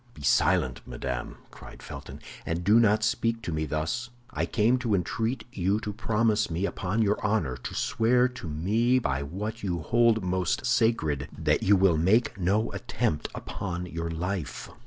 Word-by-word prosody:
"Be 75 - -11
silent, 60 -1 +2
madame," 60 0 -4 0.2
cried - - -12
Felton, - - -9 0.2
"and 85 +1 -3
do 105 +5 +5
not 110 -1 +3
speak 115 0 0
to 85 - -3
me 80 -1 -2
thus; 100 +12 -2 0.2
I - - -1
came 120 +3 +2
to 115 -5 +1
entreat 110 +7 -1
you 100 0 +1
to 105 -1 -5
promise 110 0 +1
me 85 +4 -1
upon 100 +3 -1
your 105 0 0
honor, 105 - 0
to 65 - -7
swear 125 0 +2
to 125 -8 -8
me 110 +11 +2
by 70 - 0
what 105 +10 -5
you 90 -4 -2
hold 115 +4 +3
most 90 +5 0
sacred, 110 - +1
that - - +1
you 100 - +5
will 95 -4 +4
make 105 +9 +3
no 100 +5 +1
attempt 75 -1 -2
upon 90 -2 -4
your 85 -1 -4
life." 85 0 -4
100 Hz, 170 wpm, -27 LUFS, 85-115 Hz, 0.2 s, do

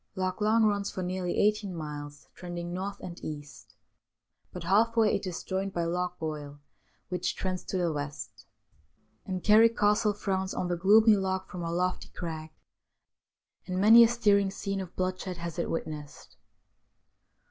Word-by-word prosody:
Loch 185 +1 -2
Long 220 +2 +4
runs 205 -2 +1
for 185 - -4
nearly 180 0 -2
eighteen 210 -2 +1
miles, 145 -2 -7
trending 175 -1 -6
north 195 +2 -4
and 175 -1 -9
east, 145 -2 -8 0.8
but 180 - -7
half 225 +6 +2
way 220 -2 +4
it - - -2
is 180 - -5
joined 190 +1 -3
by 170 - -1
Loch 180 +2 -2
Goil, 150 -2 -5 0.5
which 180 -1 -2
trends 185 -1 -3
to 190 - -3
the 175 -3 0
west, 145 -2 -6 0.8
and 185 -2 -3
Carrick 225 +2 +6
Castle 210 0 +3
frowns 190 -2 -2
on 180 - -2
the 175 - +1
gloomy 210 +5 +6
loch 190 -1 -2
from 180 - -6
a 165 0 -3
lofty 180 +2 -1
crag, 160 -2 -6 1.2
and 185 0 -2
many 225 +4 +9
a - - +6
stirring 205 -4 +3
scene 195 0 -3
of 180 -2 -9
bloodshed 185 0 -3
has 170 -1 -5
it - - -1
witnessed. 150 -3 -6
185 Hz, 160 wpm, -29 LUFS, 170-200 Hz, 1.2 s, many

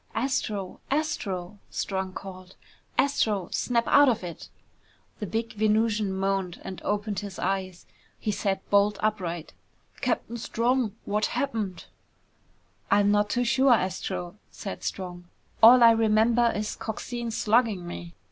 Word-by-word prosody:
"Astro, 215 -6 -2
Astro 205 - -2
" - - -38
Strong 190 -1 -3
called. 185 -1 -9 0.4
"Astro, 215 -9 +1
snap 235 -2 +1
out 285 -1 +6
of 225 -6 0
it!" 170 -2 -8 0.7
The 210 - -4
big 225 +3 -3
Venusian 215 -1 +1
moaned 190 -2 -1
and 190 -3 -7
opened 205 0 -1
his 200 -2 -7
eyes. 185 -1 -2 0.3
He 215 - -2
sat 195 -1 -2
bolt 205 0 +4
upright. 180 -6 -2 0.4
"Captain 235 - -2
Strong! 235 -1 0
What 210 +1 +1
happened?" 210 -10 -2 1.0
"I'm 205 0 +4
not 205 0 +2
too 245 - +1
sure, 265 +1 +4
Astro," 185 -1 -3
said 195 - -7
Strong. 175 -2 -5 0.4
"All 240 +2 +9
I 230 - +9
remember 225 +1 +3
is 210 0 -2
Coxine 235 +2 -5
slugging 220 -4 +1
me." 175 -1 -8
210 Hz, 130 wpm, -27 LUFS, 190-230 Hz, 1.0 s, All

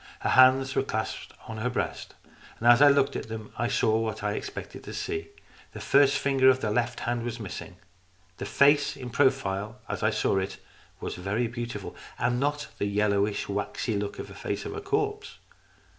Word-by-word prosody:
Her - - 0
hands 130 +1 +6
were - - +3
clasped 110 -5 -4
on 115 - -6
her 125 +3 0
breast. 125 - -3 0.4
As 120 +3 +6
I 145 - +9
looked 140 -1 +3
at - - -4
them, 110 -1 -7
I 120 - 0
saw 110 -1 +2
what 110 -2 -3
I 105 - +1
had 105 - -2
expected - - -7
to - - -7
see. 80 0 -3 0.5
The - - -7
first 140 0 +4
finger 135 -2 +4
of 130 0 +4
the 110 -4 -1
left 120 +1 -1
hand 120 0 -1
was 120 -1 -4
missing. 95 -2 -7 0.6
The - - -5
face 145 0 +4
in 125 -2 -7
profile, 115 -5 +1
as - - -4
I 110 - +3
saw 105 -2 +1
it, 95 +1 -4 0.4
was - - -4
very 100 +6 -1
beautiful, 120 -3 -5 0.2
and 120 +2 +1
had 120 - -1
not 145 +2 -1
the 100 - 0
yellowish 100 0 +1
waxy 105 +2 -2
look 100 0 -3
of - - -5
the - - -11
face - - -4
of 415 0 -5
a 425 - -5
corpse. 420 +1 -2
120 Hz, 200 wpm, -27 LUFS, 105-135 Hz, 0.6 s, I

